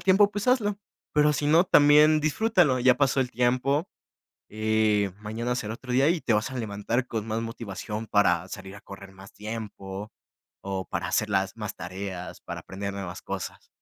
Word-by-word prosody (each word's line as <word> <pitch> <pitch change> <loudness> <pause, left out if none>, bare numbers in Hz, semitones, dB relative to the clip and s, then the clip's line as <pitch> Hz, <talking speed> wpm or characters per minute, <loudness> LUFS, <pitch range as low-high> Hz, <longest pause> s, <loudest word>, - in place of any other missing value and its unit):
tiempo, 200 +2 +5
pues 205 +3 -4
hazlo. 210 -5 +2 0.3
Pero 150 0 +4
si 145 +2 -1
no, 165 +4 +5
también 150 -1 +6
disfrútalo. 155 - +2
Ya 125 0 +4
pasó 140 -1 +2
el 125 -1 -1
tiempo, 130 +7 +1 0.6
eh, 110 -2 +1
mañana 115 +3 -3
será 110 -1 -3
otro 125 0 -7
día 135 +4 +4
y 170 -1 +1
te 115 - +1
vas 105 +4 +1
a 130 - -6
levantar 115 +2 -2
con 110 -3 -4
más 115 +1 -1
motivación 110 -1 -5
para 90 -3 +2
salir 95 +1 -8
a 100 - -11
correr 100 -1 -11
más 95 +1 -14
tiempo, 105 -2 -7 0.5
o 95 -1 -3
para - - -3
hacer 110 - +1
las 95 -1 0
más 105 -2 -5
tareas 90 +1 -6
para - - -7
aprender 100 +1 -5
nuevas 95 -3 -6
cosas. - - -6
115 Hz, 180 wpm, -26 LUFS, 100-140 Hz, 0.6 s, también